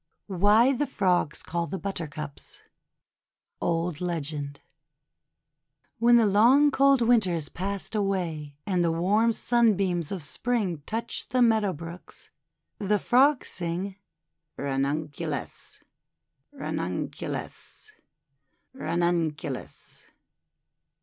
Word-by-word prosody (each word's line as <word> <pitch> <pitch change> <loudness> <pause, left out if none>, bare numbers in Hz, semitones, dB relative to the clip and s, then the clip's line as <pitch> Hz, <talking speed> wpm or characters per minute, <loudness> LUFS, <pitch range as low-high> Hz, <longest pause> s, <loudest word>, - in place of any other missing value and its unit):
WHY 210 +7 +4
THE 290 +2 -1
FROGS 180 - 0
CALL 170 0 -2
THE 195 - -4
BUTTERCUPS 155 -7 -6 1.0
Old 165 -1 -1
Legend 150 -4 -3 1.4
WHEN 240 +1 +6
the 230 - +5
long 240 +9 +5
cold 275 -2 +4
Winter 225 -5 +4
is 155 -3 -2
passed 200 +3 -3
away, 175 -8 -2
and 185 -4 +1
the 165 - +2
warm 205 +8 +2
Sunbeams 200 -9 +2
of 190 -5 -4
Spring 190 0 -1
touch 230 +2 -2
the 255 0 +2
meadow 220 -4 +3
brooks, 170 +2 -10 0.5
the 210 +1 +1
Frogs 260 +6 +3
sing: 185 +3 -3 0.3
— 80 0 -55
"Ranunculus! 145 +2 -3 0.7
Ranunculus! 90 0 -5 0.8
Ranunculus!' 170 - -3
180 Hz, 95 wpm, -27 LUFS, 160-220 Hz, 1.4 s, WHEN